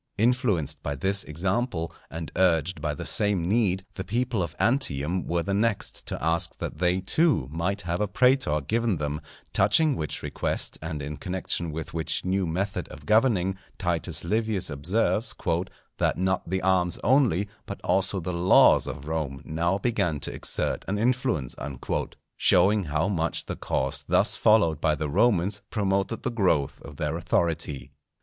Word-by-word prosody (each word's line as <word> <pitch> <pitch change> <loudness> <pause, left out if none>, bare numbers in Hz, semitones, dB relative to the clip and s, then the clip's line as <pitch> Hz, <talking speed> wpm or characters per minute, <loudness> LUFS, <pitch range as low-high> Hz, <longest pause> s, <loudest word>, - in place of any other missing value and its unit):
Influenced 105 - +1
by 70 0 -3
this 95 +8 +1
example, 85 +1 -1 0.2
and 80 -2 -6
urged 85 -3 +2
by 75 -1 -1
the - - -6
same 105 -5 +2
need, 95 -2 +1
the 95 - -5
people 120 0 -1
of 85 - -4
Antium 90 - 0
were 85 0 0
the 100 - -2
next 105 +1 -1
to - - -2
ask 85 +2 0
that - - -5
they 90 +1 +2
too 150 - +2
might 90 +5 -1
have 85 +1 -2
a 105 - +1
prætor 100 - +2
given 115 0 +1
them; 75 0 -3 0.3
touching 135 +10 +4
which 75 - -4
request - - -2
and 80 -2 -4
in 75 +1 -5
connection 90 -2 -3
with 80 +1 -6
which 80 +1 -2
new 95 0 +1
method 95 +5 -2
of 70 - -12
governing, 105 - +3 0.2
Titus 85 -5 -1
Livius 110 -6 0
observes, 105 - 0 0.6
"that - - +1
not 95 -2 0
the 95 +1 -1
arms 90 -2 +2
only 125 - +3 0.2
but - - -6
also 95 0 +1
the 90 +1 -4
laws 85 +2 +5
of 70 - -6
Rome 75 -4 -3
now 85 +4 0
began 85 - 0
to - - -4
exert - - -1
an 100 - -1
influence;" 110 - 0 0.8
showing 105 0 +4
how 80 +3 0
much 85 -4 -1
the - - -4
course - - -2
thus - - +3
followed 85 -9 +3
by 75 -1 +2
the 75 -1 -3
Romans 100 +2 +2
promoted 100 0 -1
the 130 - -1
growth 90 - +1
of 70 - -11
their 75 +2 -2
authority. 85 -4 -1
90 Hz, 160 wpm, -26 LUFS, 80-105 Hz, 0.8 s, laws